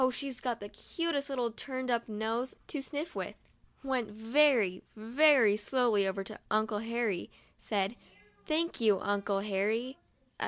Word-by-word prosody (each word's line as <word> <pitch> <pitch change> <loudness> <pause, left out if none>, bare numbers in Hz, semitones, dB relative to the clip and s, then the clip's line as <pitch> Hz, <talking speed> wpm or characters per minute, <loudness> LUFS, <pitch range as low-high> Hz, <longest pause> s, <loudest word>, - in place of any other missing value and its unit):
she's 265 0 -4
got 240 -3 -2
the 205 - -7
cutest 300 +4 -2
little 250 -4 -1
turned 255 +2 -4
up 235 -1 0
nose 225 +4 -2
to 290 - -4
sniff 300 +4 -4
with), - - -4 0.5
went 260 -5 -1
very, 225 -3 +3
very 235 0 +5
slowly 215 -2 +2
over 195 +1 -2
to 210 +2 -9
Uncle 215 -1 +1
Harry, 225 -4 -1 0.3
said: 200 +1 -1 0.5
"Thank 325 -2 0
you, 210 -4 +4
Uncle 200 -1 0
Harry. 215 +6 -1
230 Hz, 135 wpm, -32 LUFS, 210-265 Hz, 0.5 s, very